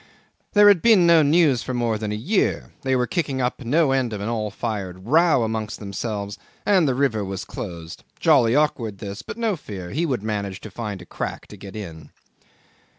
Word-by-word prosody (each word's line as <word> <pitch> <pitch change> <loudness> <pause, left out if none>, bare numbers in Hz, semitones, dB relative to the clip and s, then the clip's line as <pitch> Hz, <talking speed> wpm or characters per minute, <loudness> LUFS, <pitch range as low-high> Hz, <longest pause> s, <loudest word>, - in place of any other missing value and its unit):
There 205 0 +7
had 200 -5 +6
been 215 -7 +6
no 170 -1 +6
news 150 -4 +4
for 130 - -4
more 115 -3 0
than 105 -1 -3
a - - -1
year; 180 - 0
they 130 0 +1
were 125 -1 +2
kicking 145 -4 -2
up 125 +1 -1
no 145 +4 +2
end 130 -4 0
of 105 - -4
an 100 +3 -3
all 110 -2 -2
fired 100 -4 -5
row 155 0 +4
amongst 110 0 -3
themselves, 100 0 -4 0.3
and 185 -6 +4
the 130 - +1
river 125 -6 +1
was 95 -1 -5
closed. 85 -1 -8 0.2
Jolly 115 +1 +4
awkward, 120 -9 0
this; 100 +1 -7
but, - - -8
no 225 -4 0
fear; 95 - -8
he 165 +5 0
would 125 -8 -2
manage 100 -3 -3
to 110 - -9
find 105 -4 -5
a - - -15
crack - - -5
to - - -10
get 100 0 -11
in. 85 -7 -8
115 Hz, 205 wpm, -23 LUFS, 100-145 Hz, 0.3 s, There